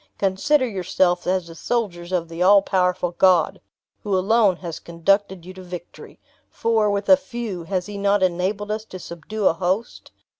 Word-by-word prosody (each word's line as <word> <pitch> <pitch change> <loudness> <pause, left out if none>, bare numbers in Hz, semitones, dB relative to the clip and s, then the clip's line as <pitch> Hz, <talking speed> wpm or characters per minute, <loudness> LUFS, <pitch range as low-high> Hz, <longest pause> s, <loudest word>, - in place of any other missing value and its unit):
Consider 255 +9 +1
yourselves 185 -3 0
as 185 -1 0
the 165 - -11
soldiers 175 -3 -3
of 175 -2 -1
the 165 +1 -7
all 195 +2 +6
powerful 180 -2 0
God, 175 -2 +3 0.4
who 200 -2 0
alone 205 0 +3
has 170 -2 -7
conducted 190 +2 0
you 185 - -9
to 185 - -11
victory; 180 -1 -10 0.3
for, 225 -2 +1
with 200 0 -2
a 285 - +8
few, 235 -10 -6
has 185 0 -2
he 205 -1 -7
not 200 0 +2
enabled 190 +4 -1
us 215 0 -3
to 185 - -9
subdue 185 +5 -6
a - - +5
host? 185 +6 -3
190 Hz, 175 wpm, -22 LUFS, 175-205 Hz, 0.4 s, a